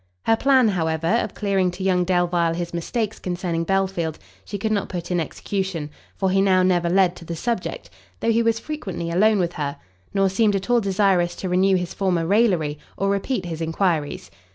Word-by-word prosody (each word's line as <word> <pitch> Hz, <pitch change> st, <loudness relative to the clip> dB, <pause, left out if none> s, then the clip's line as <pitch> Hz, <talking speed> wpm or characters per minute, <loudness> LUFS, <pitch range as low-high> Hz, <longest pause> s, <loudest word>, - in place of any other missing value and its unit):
Her 225 Hz, -, +4 dB
plan, 260 Hz, -1 st, +4 dB
however, 160 Hz, -4 st, -1 dB
of 220 Hz, +2 st, 0 dB
clearing 195 Hz, -3 st, +1 dB
to 180 Hz, +2 st, -6 dB
young 180 Hz, -2 st, +2 dB
Delvile 175 Hz, -2 st, +1 dB
his 175 Hz, 0 st, -4 dB
mistakes 215 Hz, +6 st, -2 dB
concerning 175 Hz, -2 st, -2 dB
Belfield, 190 Hz, -4 st, 0 dB, 0.3 s
she 205 Hz, -, -5 dB
could 220 Hz, +2 st, -2 dB
not 205 Hz, -2 st, 0 dB
put 180 Hz, -1 st, -5 dB
in 175 Hz, -, +1 dB
execution; 170 Hz, -1 st, -3 dB, 0.3 s
for 190 Hz, -1 st, +1 dB
he 195 Hz, +1 st, +3 dB
now 185 Hz, -2 st, +4 dB
never 175 Hz, -2 st, +2 dB
led 185 Hz, -1 st, +3 dB
to -, -, -11 dB
the 170 Hz, -, -4 dB
subject, 235 Hz, +7 st, -3 dB, 0.3 s
though 230 Hz, -, +1 dB
he 230 Hz, +1 st, +3 dB
was 230 Hz, -1 st, +2 dB
frequently 190 Hz, -, -5 dB
alone 210 Hz, +5 st, +4 dB
with 175 Hz, -2 st, 0 dB
her, 145 Hz, -1 st, -3 dB, 0.3 s
nor 195 Hz, -1 st, +2 dB
seemed 205 Hz, +2 st, +2 dB
at 195 Hz, +5 st, -2 dB
all 240 Hz, -1 st, +4 dB
desirous 190 Hz, -3 st, +2 dB
to 185 Hz, -, -4 dB
renew 190 Hz, +2 st, +3 dB
his 180 Hz, -1 st, -2 dB
former 180 Hz, -4 st, 0 dB
raillery, 175 Hz, -7 st, +2 dB, 0.2 s
or 195 Hz, +1 st, 0 dB
repeat 200 Hz, 0 st, -1 dB
his 165 Hz, -2 st, -5 dB
enquiries. 160 Hz, -, -1 dB
185 Hz, 195 wpm, -23 LUFS, 170-200 Hz, 0.3 s, Her